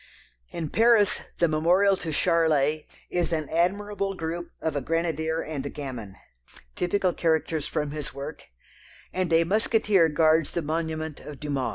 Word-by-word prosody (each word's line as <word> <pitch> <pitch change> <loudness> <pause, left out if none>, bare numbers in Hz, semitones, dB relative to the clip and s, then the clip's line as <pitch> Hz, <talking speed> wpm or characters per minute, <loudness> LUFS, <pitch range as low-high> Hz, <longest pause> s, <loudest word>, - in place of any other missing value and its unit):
In 160 - -4
Paris 225 -3 +4 0.2
the 170 - +3
memorial 175 +6 +3
to 165 - -4
Charlet 155 -2 +2 0.2
is 175 -1 0
an 155 -3 -1
admirable 195 +4 0
group 170 0 -4
of 160 -2 -2
a 145 - 0
grenadier 160 +1 -1
and 150 -4 -4
a 140 - -4
gamin 125 -10 -7 0.6
typical 180 0 +1
characters 160 -2 0
from 150 -2 -2
his 150 -1 -5
work, 140 +3 -8 0.7
and 185 -2 -1
a 165 0 +5
musketeer 205 -2 +3
guards 155 0 +3
the 170 - -1
monument 160 0 -3
of 145 -3 -10
Dumas. 140 -4 -2
160 Hz, 150 wpm, -26 LUFS, 150-175 Hz, 0.7 s, a